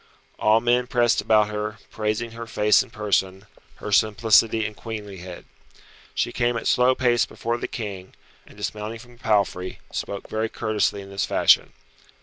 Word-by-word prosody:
All 110 +1 +4
men 120 +1 +2
pressed 120 -3 +2
about 105 -1 +3
her, 105 0 -4
praising 110 +2 -2
her 115 0 -8
face 105 -1 +4
and 130 - -9
person, 100 -3 -1 0.3
her 105 - -7
simplicity 110 +1 +4
and 105 - -5
queenlihead. 100 -6 -8 0.7
She - - 0
came 120 0 0
at - - -6
slow 125 +1 +4
pace 120 -2 +2
before 120 +1 -3
the - - -3
King, 100 -5 -7 0.3
and - - -17
dismounting 110 +2 -4
from 120 +1 -16
the - - -25
palfrey, 100 -4 0
spoke 100 -1 -5
very 110 +1 -2
courteously 105 -2 -1
in 100 - -12
this 100 - -1
fashion. - - +4
110 Hz, 160 wpm, -24 LUFS, 105-115 Hz, 0.7 s, All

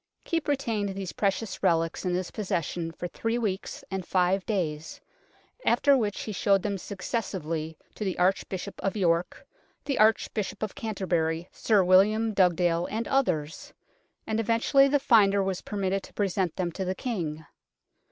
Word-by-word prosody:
Keepe 330 -2 -1
retained 225 -9 -1
these 195 -3 -5
precious 200 +1 -1
relics 165 0 +1
in 180 -1 +1
his 180 0 -3
possession 170 -5 -2
for 175 +2 -5
three 225 +6 -2
weeks 205 -5 -3
and 190 -1 -2
five 185 +2 +1
days, 160 -7 -2 0.6
after 280 -1 +4
which 215 -6 -1
he 215 - -5
showed 195 -1 +2
them 200 -2 -2
successively 165 -6 -4 0.2
to - - -5
the 190 -3 -2
Arch 185 +2 +1
bishop 190 +1 -6
of 195 +2 -1
York, 170 -2 0 0.4
the 280 - -1
Archbishop 215 -1 +1
of 215 - -3
Canterbury, 175 - -1
Sir 210 -4 +2
William 210 +5 +4
Dugdale 175 -2 +2
and 225 +2 -3
others, 170 - -1 0.5
and 220 0 -1
eventually 230 +5 +4
the 285 +1 +3
finder 200 -7 +4
was 190 -1 -2
permitted 195 -1 -2
to - - -14
present 190 -4 0
them 180 -2 -2
to 190 - -4
the 185 0 -2
King. 160 -11 -4
195 Hz, 155 wpm, -27 LUFS, 175-220 Hz, 0.6 s, after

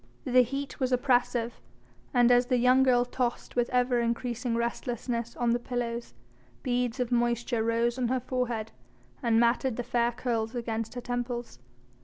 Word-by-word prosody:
The 255 -1 +5
heat 275 +3 -3
was 260 -1 0
oppressive, 245 - +1 0.5
and 245 0 +4
as 245 0 +4
the 250 -1 +2
young 250 +2 +5
girl 245 -2 +4
tossed 245 -1 -3
with 240 -1 +1
ever 250 -1 +2
increasing 235 0 -1
restlessness 235 0 -2
on 240 -1 +1
the 240 - +2
pillows, 240 -1 -4 0.5
beads 250 -1 -1
of 250 -1 -1
moisture 240 -1 +1
rose 230 +2 +1
on 245 - +1
her 260 +2 +1
forehead 240 -3 -2 0.5
and 230 -3 +3
matted 235 +1 +2
the 245 - -3
fair 240 0 +1
curls 235 -1 -2
against 225 -1 -3
her 245 - -4
temples. 245 - -4
245 Hz, 160 wpm, -28 LUFS, 235-250 Hz, 0.5 s, The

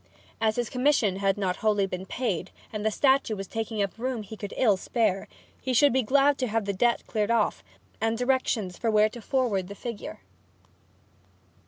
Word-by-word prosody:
As 220 -1 +2
his 240 -2 -2
commission 250 -7 +2
had 195 0 +1
not 185 -3 -1
wholly 210 -2 +2
been 185 0 -6
paid, 195 -8 -2 0.2
and 210 -1 -3
the 220 - +3
statue 265 0 +2
was 195 -1 -5
taking 220 0 -2
up 200 +3 -5
room 250 -2 -2
he 210 +2 -9
could 205 -2 -7
ill 220 -6 +4
spare, 195 -1 0 0.3
he 255 -1 -1
should 285 +2 +5
be 260 - +3
glad 275 +4 +3
to 255 - 0
have 220 -1 -1
the 200 - -1
debt 235 +5 +1
cleared 215 -1 -1
off, 230 -3 +1 0.4
and 225 0 +1
directions 245 -7 0
where 215 -2 +4
to 235 +2 -10
forward 220 -7 0
the 200 - -8
figure. 230 -1 -7
220 Hz, 185 wpm, -27 LUFS, 200-245 Hz, 0.4 s, should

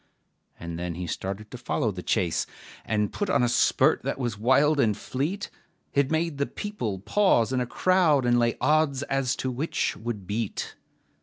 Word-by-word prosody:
And 85 0 -6
then 85 -1 -3
he 90 +1 -4
started 100 +5 -5
to 125 - -8
follow 115 -2 -1
the 90 -2 -6
chase, 85 -2 0 0.4
And 105 -1 0
put 205 -1 -2
on 125 - +3
a - - +3
spurt 120 - +3
that - - -3
was 120 -5 -2
wild 135 +7 +3
and 110 -6 +2
fleet, 155 +10 -3 0.4
It 140 -1 +2
made 160 -2 -1
the 140 - +1
people 165 - -4
pause 130 - +2
in 130 - +1
a 125 - -2
crowd, 165 -5 +3
And 120 0 +4
lay 120 -1 +1
odds 150 -3 +2
as 135 -1 0
to 130 - -2
which 140 +7 -1
would 110 -4 -5
beat. 105 +2 -3
125 Hz, 180 wpm, -26 LUFS, 105-145 Hz, 0.4 s, And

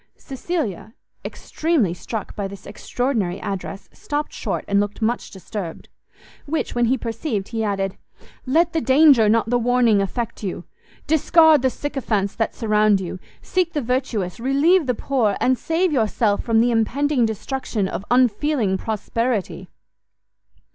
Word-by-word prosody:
Cecilia, 255 - -4 0.3
extremely 310 - -1
struck 210 +4 -6
by 200 -1 -3
this 195 0 -11
extraordinary 210 -3 -2
address, 195 0 -5
stopt 295 0 -4
short - - -3
and 200 0 +2
looked 205 0 -2
much 230 +2 -1
disturbed: 190 -2 -7 0.6
which, 320 +2 -2
when 240 0 +2
he 255 +3 +2
perceived, 225 -3 -3
he 225 -1 -2
added, 195 -2 -2 0.5
"Let 320 +5 +2
the 325 - 0
danger, 265 -5 +5
not 225 +1 +2
the 245 - +3
warning 240 -3 +3
affect 230 +4 -4
you! 190 -4 -4 0.4
discard 320 -1 +5
the 260 - +2
sycophants 235 -8 -2
that 225 - -2
surround 215 -2 +2
you, 185 0 -6 0.2
seek 360 -2 0
the 295 - -1
virtuous, 235 -6 -2
relieve 285 +6 +3
the 250 - +1
poor, 225 -5 0
and 255 - +3
save 330 +6 0
yourself 220 -4 +1
from 225 -2 +2
the 240 +1 +2
impending 255 +4 +1
destruction 220 -1 -3
of 190 - -5
unfeeling 245 -4 +2
prosperity!" 225 0 -2
230 Hz, 140 wpm, -21 LUFS, 205-275 Hz, 0.6 s, danger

